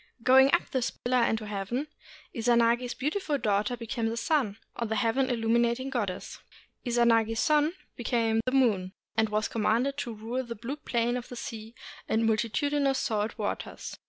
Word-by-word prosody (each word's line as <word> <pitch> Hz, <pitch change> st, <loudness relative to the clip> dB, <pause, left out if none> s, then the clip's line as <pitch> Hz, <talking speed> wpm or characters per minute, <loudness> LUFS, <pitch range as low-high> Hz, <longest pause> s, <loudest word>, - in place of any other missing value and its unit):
Going 265 Hz, +2 st, +6 dB
up 345 Hz, -, +2 dB
this 260 Hz, -3 st, 0 dB
pillar 250 Hz, 0 st, 0 dB
into 220 Hz, -1 st, -1 dB
heaven, 210 Hz, +7 st, -3 dB, 0.5 s
Izanagi's 235 Hz, +1 st, +2 dB
beautiful 300 Hz, +2 st, -1 dB
daughter 210 Hz, 0 st, 0 dB
became 230 Hz, 0 st, -2 dB
the 230 Hz, -, -4 dB
sun, 240 Hz, -7 st, 0 dB, 0.2 s
or 235 Hz, -, -2 dB
the 220 Hz, -, -1 dB
Heaven 250 Hz, +3 st, +1 dB
illuminating 235 Hz, +2 st, +1 dB
Goddess. 205 Hz, -8 st, -3 dB, 0.4 s
Izanagi's 230 Hz, -2 st, +2 dB
son 305 Hz, +1 st, +3 dB, 0.2 s
became 230 Hz, -2 st, +1 dB
the 255 Hz, -, 0 dB
moon, 210 Hz, -9 st, +2 dB, 0.2 s
and 220 Hz, 0 st, +2 dB
was 215 Hz, 0 st, 0 dB
commanded 235 Hz, +5 st, 0 dB
to 245 Hz, -5 st, -3 dB
rule 230 Hz, +5 st, -3 dB
the 235 Hz, -1 st, -6 dB
blue 245 Hz, +7 st, -5 dB
plane 240 Hz, -3 st, 0 dB
of 245 Hz, -, -7 dB
the 245 Hz, -, -7 dB
sea 225 Hz, 0 st, -7 dB, 0.3 s
and 225 Hz, +1 st, +2 dB
multitudinous 270 Hz, +5 st, +1 dB
salt 215 Hz, -3 st, -1 dB
waters. -, -, -4 dB
235 Hz, 160 wpm, -28 LUFS, 225-260 Hz, 0.5 s, Going